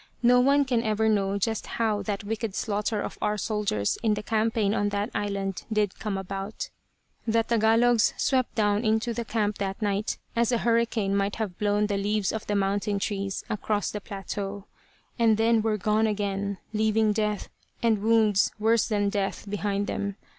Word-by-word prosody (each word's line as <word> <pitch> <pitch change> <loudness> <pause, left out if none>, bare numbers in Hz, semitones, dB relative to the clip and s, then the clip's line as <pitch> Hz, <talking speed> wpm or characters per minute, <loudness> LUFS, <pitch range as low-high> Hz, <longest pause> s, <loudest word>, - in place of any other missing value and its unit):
No 250 +1 +6
one 280 +3 +4
can 245 -3 +1
ever 220 -1 +1
know 200 -2 +1
just 220 +2 -1
how 220 -3 +1
that 200 +1 -3
wicked 220 -1 -3
slaughter 210 0 -1
of - - -6
our 210 0 0
soldiers 205 - -1
in 220 -2 +2
the 210 - -5
campaign 220 -1 +1
on 205 -1 +1
that 205 +3 -2
island 200 -2 -2
did 210 -3 0
come 210 -3 -2
about. 195 +2 -5 0.6
The 225 0 +3
Tagalogs 225 0 +3
swept 260 -2 +1
down 210 0 +2
into 220 +1 +1
the 235 +1 -3
camp 210 -2 -1
that 195 -1 -3
night 205 0 -1 0.2
as 235 +1 +2
a 240 - +3
hurricane 230 -3 +1
might 200 0 0
have 210 -5 -4
blown 205 0 +2
the 205 -1 -1
leaves 205 0 0
of 220 - -5
the 205 - 0
mountain 200 +1 0
trees 195 -1 -2
across 210 0 -1
the 210 - -5
plateau; 200 0 -5 0.5
and 225 -2 +4
then 225 0 +3
were 215 -1 0
gone 215 +3 +2
again, 200 -1 -2 0.2
leaving 215 0 +2
death, 210 -1 -1 0.3
and 220 -3 +3
wounds 215 -2 +3
worse 220 +1 +2
than 205 -2 +1
death, 200 0 -2
behind 205 0 -1
them. 200 -1 -3
210 Hz, 175 wpm, -27 LUFS, 200-225 Hz, 0.6 s, No